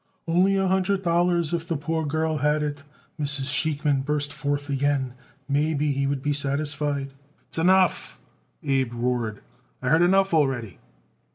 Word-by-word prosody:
"Only 180 Hz, +4 st, +3 dB
a 195 Hz, 0 st, +1 dB
hundred 190 Hz, +1 st, +1 dB
dollars 170 Hz, -1 st, +1 dB
if 170 Hz, -1 st, -2 dB
the 165 Hz, -, -1 dB
poor 160 Hz, +3 st, -2 dB
girl 155 Hz, +1 st, 0 dB
had 150 Hz, +1 st, +1 dB
it," 145 Hz, -1 st, -4 dB, 0.4 s
Mrs. 145 Hz, -2 st, +2 dB
Sheikman 150 Hz, -3 st, +1 dB
burst 145 Hz, 0 st, -1 dB
forth 145 Hz, 0 st, -2 dB
again; 140 Hz, -2 st, 0 dB, 0.3 s
"maybe 150 Hz, +1 st, +1 dB
he 140 Hz, 0 st, 0 dB
would 135 Hz, -1 st, -2 dB
be 145 Hz, 0 st, +1 dB
satisfied." 145 Hz, 0 st, -2 dB, 0.4 s
"S'enough!" 185 Hz, +2 st, +2 dB, 0.5 s
Abe 135 Hz, -4 st, 0 dB
roared. 120 Hz, -3 st, -2 dB, 0.4 s
"I 125 Hz, -, -2 dB
heard 160 Hz, +3 st, +4 dB
enough 190 Hz, +1 st, +3 dB
already." 130 Hz, -, 0 dB
145 Hz, 145 wpm, -25 LUFS, 140-165 Hz, 0.5 s, heard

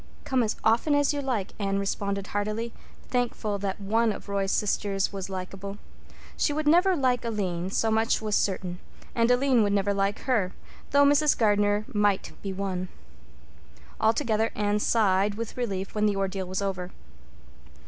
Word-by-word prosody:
"Come 260 Hz, -2 st, +1 dB
as 220 Hz, -2 st, 0 dB
often 235 Hz, +7 st, +3 dB
as 290 Hz, 0 st, +3 dB
you 290 Hz, -, -2 dB
like," 240 Hz, -8 st, -2 dB
Anne 195 Hz, -1 st, 0 dB
responded 200 Hz, 0 st, -2 dB
heartily, 215 Hz, +3 st, -3 dB, 0.4 s
thankful 230 Hz, -4 st, -1 dB
that 195 Hz, 0 st, -3 dB
one 220 Hz, +3 st, +1 dB
of -, -, -8 dB
Roy's 200 Hz, -1 st, -1 dB
sisters 200 Hz, -1 st, 0 dB
was 195 Hz, -1 st, -5 dB
likable. 195 Hz, +1 st, -6 dB, 0.6 s
She 295 Hz, -, +1 dB
would 305 Hz, 0 st, -2 dB
never 360 Hz, +4 st, +5 dB
like 255 Hz, -5 st, +1 dB
Aline, 190 Hz, -6 st, -2 dB
so 220 Hz, +3 st, +1 dB
much 220 Hz, +1 st, +2 dB
was 215 Hz, -1 st, -3 dB
certain; 180 Hz, -2 st, -1 dB, 0.3 s
and 230 Hz, 0 st, +2 dB
Aline 250 Hz, -1 st, +4 dB
would 205 Hz, -1 st, +2 dB
never 200 Hz, 0 st, +1 dB
like 200 Hz, +1 st, 0 dB
her, 220 Hz, -9 st, 0 dB, 0.4 s
though 285 Hz, 0 st, +5 dB
Mrs. 290 Hz, +1 st, +4 dB
Gardner 205 Hz, -1 st, +2 dB
might 205 Hz, -2 st, +1 dB
be 195 Hz, -, -4 dB
won. 185 Hz, -1 st, -3 dB, 1.1 s
Altogether, 220 Hz, 0 st, +2 dB
Anne 210 Hz, 0 st, +1 dB
sighed 205 Hz, -2 st, +2 dB
with 230 Hz, 0 st, -5 dB
relief 195 Hz, -6 st, -3 dB
when 210 Hz, 0 st, +2 dB
the 205 Hz, -, +1 dB
ordeal 195 Hz, -1 st, -2 dB
was 190 Hz, +2 st, -2 dB
over. 185 Hz, -2 st, -3 dB
205 Hz, 160 wpm, -27 LUFS, 195-230 Hz, 1.1 s, never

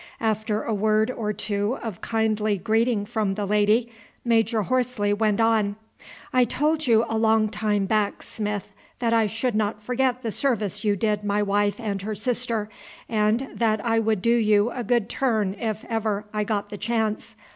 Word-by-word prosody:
After 215 Hz, -1 st, 0 dB
a 225 Hz, -, -2 dB
word 215 Hz, +2 st, +2 dB
or 215 Hz, -4 st, -2 dB
two 205 Hz, +3 st, -2 dB
of 220 Hz, -7 st, -6 dB
kindly 215 Hz, -2 st, 0 dB
greeting 220 Hz, +1 st, +1 dB
from 205 Hz, -2 st, -1 dB
the 205 Hz, 0 st, -2 dB
lady, 210 Hz, +4 st, +2 dB, 0.3 s
Major 225 Hz, -1 st, +2 dB
Horsley 245 Hz, -3 st, 0 dB
went 210 Hz, 0 st, +1 dB
on: 220 Hz, -3 st, +2 dB, 0.6 s
"I 255 Hz, -1 st, +5 dB
told 305 Hz, +4 st, 0 dB
you 230 Hz, -1 st, +4 dB
a 225 Hz, -, -1 dB
long 220 Hz, -1 st, +3 dB
time 210 Hz, -2 st, 0 dB
back, 210 Hz, 0 st, 0 dB
Smith, 210 Hz, -2 st, -4 dB, 0.2 s
that 230 Hz, -2 st, 0 dB
I 225 Hz, -2 st, +3 dB
should 225 Hz, +4 st, -2 dB
not 210 Hz, 0 st, -1 dB
forget 250 Hz, +1 st, 0 dB
the 225 Hz, -, -2 dB
service 210 Hz, -6 st, -1 dB
you 205 Hz, -1 st, +2 dB
did 210 Hz, +1 st, 0 dB
my 205 Hz, 0 st, +1 dB
wife 205 Hz, +2 st, +1 dB
and 205 Hz, -4 st, -3 dB
her 215 Hz, +2 st, -4 dB
sister, 230 Hz, 0 st, -1 dB, 0.4 s
and 220 Hz, +4 st, +1 dB
that 220 Hz, -2 st, +1 dB
I 225 Hz, -1 st, +2 dB
would 215 Hz, -4 st, 0 dB
do 235 Hz, -, +4 dB
you 215 Hz, 0 st, +3 dB
a 245 Hz, -, -4 dB
good 235 Hz, -1 st, +1 dB
turn 220 Hz, -7 st, 0 dB
if 220 Hz, -2 st, -3 dB
I -, -, -7 dB
ever 215 Hz, -2 st, -1 dB, 0.2 s
got 205 Hz, -2 st, -2 dB
the 205 Hz, -, -6 dB
chance. 220 Hz, -2 st, -2 dB
220 Hz, 180 wpm, -24 LUFS, 210-230 Hz, 0.6 s, I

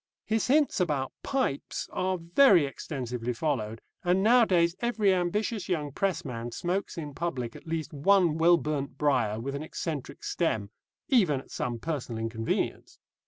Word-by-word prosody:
His 220 Hz, -1 st, 0 dB
hints 290 Hz, -1 st, +3 dB
about 150 Hz, -7 st, 0 dB
pipes 260 Hz, -, -2 dB
are 185 Hz, 0 st, 0 dB
very 175 Hz, -, +5 dB
extensively 125 Hz, -3 st, -4 dB
followed, 115 Hz, -6 st, -2 dB, 0.2 s
and 180 Hz, +2 st, +2 dB
nowadays 195 Hz, -8 st, +4 dB
every 220 Hz, -5 st, +2 dB
ambitious 195 Hz, +3 st, -1 dB
young 150 Hz, -5 st, -1 dB
pressman 130 Hz, -10 st, -2 dB
smokes 185 Hz, -, -2 dB
in 150 Hz, -3 st, -5 dB
public 130 Hz, -8 st, -3 dB
at -, -, -12 dB
least 160 Hz, -1 st, -3 dB
one 165 Hz, +1 st, +3 dB
well 170 Hz, +1 st, +6 dB
burnt 145 Hz, -4 st, -3 dB
briar 130 Hz, -7 st, +1 dB
with 135 Hz, +4 st, -4 dB
an 140 Hz, -, -4 dB
eccentric 155 Hz, -2 st, -5 dB
stem 110 Hz, -, -1 dB, 0.4 s
even 185 Hz, -, +3 dB
at -, -, -14 dB
some 120 Hz, -1 st, -2 dB
personal 130 Hz, -4 st, -4 dB
inconvenience. 115 Hz, 0 st, -2 dB
160 Hz, 145 wpm, -28 LUFS, 130-185 Hz, 0.4 s, well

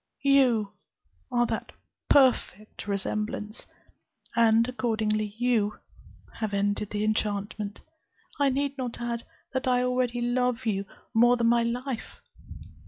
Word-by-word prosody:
You 255 Hz, -7 st, +4 dB, 0.6 s
are 240 Hz, -1 st, +3 dB
that -, -, -3 dB, 0.4 s
perfect 240 Hz, -7 st, +2 dB
resemblance; 210 Hz, +2 st, -3 dB, 0.7 s
and, 230 Hz, 0 st, +5 dB
accordingly, 215 Hz, -4 st, -1 dB
you 225 Hz, -4 st, +1 dB, 0.6 s
have 215 Hz, -3 st, -1 dB
ended 205 Hz, +1 st, 0 dB
the 210 Hz, 0 st, -2 dB
enchantment. 210 Hz, -1 st, -2 dB, 0.6 s
I 285 Hz, -1 st, +4 dB
need 280 Hz, +1 st, -1 dB
not 245 Hz, -2 st, -4 dB
add, 235 Hz, -1 st, -3 dB, 0.3 s
that 260 Hz, +1 st, -1 dB
I 250 Hz, -1 st, +3 dB
already 250 Hz, -1 st, 0 dB
love 250 Hz, +1 st, 0 dB
you 200 Hz, -3 st, 0 dB, 0.3 s
more 240 Hz, +2 st, +5 dB
than 235 Hz, -1 st, +3 dB
my 235 Hz, 0 st, +4 dB
life. 245 Hz, +1 st, -3 dB
235 Hz, 115 wpm, -27 LUFS, 215-250 Hz, 0.7 s, and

